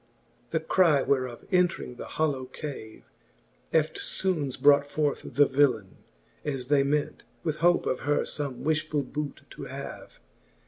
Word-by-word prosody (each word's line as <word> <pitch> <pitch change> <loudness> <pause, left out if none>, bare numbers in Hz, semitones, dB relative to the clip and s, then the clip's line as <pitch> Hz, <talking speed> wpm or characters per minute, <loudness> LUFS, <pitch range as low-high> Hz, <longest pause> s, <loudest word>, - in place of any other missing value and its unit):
X. - - -33 0.4
The - - 0
cry 165 -7 +4
whereof 130 -3 -1
entring 180 -9 +1
the - - -7
hollow 145 -5 -1
cave, 130 -5 -8 0.7
Eftfoones 155 -1 0
brought 145 0 +6
forth 145 0 -1
the 145 +1 +7
villaine, 140 -1 +1 0.5
as 135 -3 -3
they 145 -1 +5
ment, 145 +2 -1 0.2
With 155 -3 -1
hope 175 +2 +3
of 130 - 0
her 145 +1 +1
fome 140 -4 -4
wifhfull 155 -2 0
boote 150 -1 -5
to - - -8
have. - - -8
145 Hz, 140 wpm, -28 LUFS, 135-155 Hz, 0.7 s, the